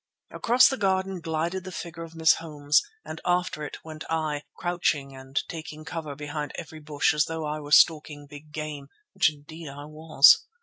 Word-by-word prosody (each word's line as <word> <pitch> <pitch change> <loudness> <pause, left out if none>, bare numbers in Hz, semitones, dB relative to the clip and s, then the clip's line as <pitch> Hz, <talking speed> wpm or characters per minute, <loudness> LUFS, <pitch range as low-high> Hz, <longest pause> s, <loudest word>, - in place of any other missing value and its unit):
Across 245 +2 +5
the 265 - -2
garden 190 -2 0
glided 165 +3 -2
the 185 - -8
figure 170 -2 -7
of 165 0 -9
Miss 160 0 +5
Holmes 150 -2 +1 0.2
and 160 - -7
after 180 -3 0
it 150 - -6
went 155 -1 -8
I, 155 -2 -1 0.2
crouching 155 -6 -1
and 135 +1 -3
taking 155 -1 -8
cover 160 -4 -5
behind 150 +1 -5
every 160 -1 -8
bush 150 -1 +1
as 150 0 +2
though 160 -1 -4
I 150 +1 -3
were 145 -1 -9
stalking 150 -1 +4
big 145 +1 -13
game, 150 -2 -6 0.3
which - - +3
indeed 155 +1 -11
I 145 +1 -9
was. 155 -2 +5
155 Hz, 180 wpm, -26 LUFS, 150-165 Hz, 0.3 s, Across